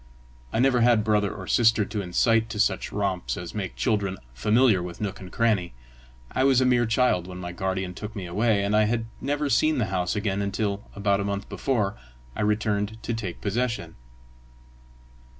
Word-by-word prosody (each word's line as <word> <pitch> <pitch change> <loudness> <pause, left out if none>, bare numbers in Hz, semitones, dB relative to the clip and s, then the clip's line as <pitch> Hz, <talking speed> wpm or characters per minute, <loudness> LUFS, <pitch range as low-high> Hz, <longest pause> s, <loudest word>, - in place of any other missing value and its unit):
I - - -1
never 125 0 +3
had 115 -2 +4
brother 105 -2 +2
or 95 - -7
sister 115 0 +3
to 105 0 -3
incite 115 +5 +2
to 110 -2 -5
such 100 -3 +1
romps 100 -3 -2
as 90 -1 -6
make 100 -3 -4
children 100 -5 0 0.2
familiar 105 - +3
with 85 -1 -7
nook 100 -2 -3
and 95 -1 -10
cranny; 105 - +1 0.6
I 130 - +1
was 135 -2 +5
a 130 - +3
mere 120 -2 +3
child 110 -6 +2
when 90 -1 -8
my 90 -1 -5
guardian 95 0 -2
took 105 +4 -7
me 95 -3 -5
away; 105 +3 +1
and 100 +1 +1
I 105 0 +5
had 115 +1 0 0.2
never 145 +2 -1
seen 155 +2 +3
the 120 - +1
house 90 -1 0
again 100 -1 -1
until, 100 0 -2
about 100 -1 +1
a - - -1
month 100 0 -3
before, 110 -8 -1 0.4
I - - -3
returned 105 0 0
to 120 - -2
take 105 -6 -5
possession. 115 -5 -2
105 Hz, 185 wpm, -25 LUFS, 95-115 Hz, 0.6 s, was